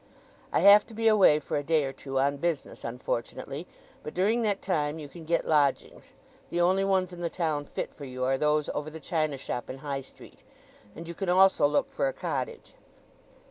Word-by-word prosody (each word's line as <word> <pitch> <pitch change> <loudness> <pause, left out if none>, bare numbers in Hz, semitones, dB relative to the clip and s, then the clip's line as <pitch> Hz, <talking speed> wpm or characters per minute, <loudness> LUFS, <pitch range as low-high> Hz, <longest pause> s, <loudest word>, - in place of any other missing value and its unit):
I - - +2
have 205 +1 +8
to 225 - -12
be 225 +1 +1
away 200 -8 +6
for 150 - -3
a 145 - -2
day 155 0 +2
or 135 - -4
two 135 -1 -5
on 140 +1 +2
business, 165 0 -3
unfortunately; 125 +5 -4 0.3
but 150 - -8
during 210 +6 +2
that 205 -3 0
time 150 -4 -1
you 150 -2 -7
can 165 +3 -12
get 170 +1 0
lodgings—the 150 +3 -2
only 185 +3 +3
ones 190 -2 +1
in 175 - -8
the 170 - -1
town 155 -5 -2
fit - - -5
for 145 - -9
you 130 -1 -5
are 130 +1 +2
those 150 0 +2
over 150 +1 -3
the 160 +1 -9
china 155 -2 -1
shop 125 -2 -5
in 130 - -6
High 140 -1 -4
Street—and 130 +1 -16
you 170 - -5
can 190 +1 -3
also 185 -4 +5
look 150 - +1
for - - 0
a - - -2
cottage." 475 -1 -4
155 Hz, 200 wpm, -28 LUFS, 140-185 Hz, 0.3 s, have